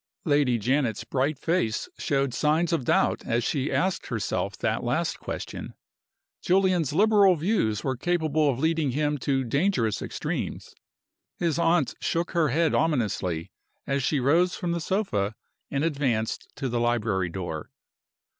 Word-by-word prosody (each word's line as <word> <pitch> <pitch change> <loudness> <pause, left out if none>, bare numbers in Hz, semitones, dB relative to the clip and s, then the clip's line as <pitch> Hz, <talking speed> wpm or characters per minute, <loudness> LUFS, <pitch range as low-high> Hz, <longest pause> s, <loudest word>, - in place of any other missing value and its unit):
Lady 145 -6 +3
Janet's 120 -1 0
bright 135 +5 -1
face 160 - 0
showed 140 -5 0
signs 155 +5 +1
of 145 -7 0
doubt - - +2
as 115 +1 0
she 140 +2 -1
asked 190 0 0
herself - - -2
that - - -1
last - - -1
question. - - -6 0.7
Julian's 180 -5 +2
liberal 200 +2 +5
views 155 - 0
were 130 -1 -1
capable 155 0 +1
of 130 - 0
leading 160 -2 +1
him 150 +1 0
to 135 +1 0
dangerous 135 - 0
extremes. - - -4 0.6
His 170 -2 0
aunt 165 -4 +2
shook 170 +1 -1
her 165 -4 +2
head 160 +5 +2
ominously 105 - 0 0.3
as 140 0 0
she 140 +2 +1
rose 165 +8 +3
from 175 - -2
the 170 0 -1
sofa 115 - -1 0.3
and 140 +1 -1
advanced 135 -8 -1
to 135 - -3
the 120 -1 -1
library 110 -6 0
door. 85 -3 -5
145 Hz, 145 wpm, -26 LUFS, 120-170 Hz, 0.7 s, liberal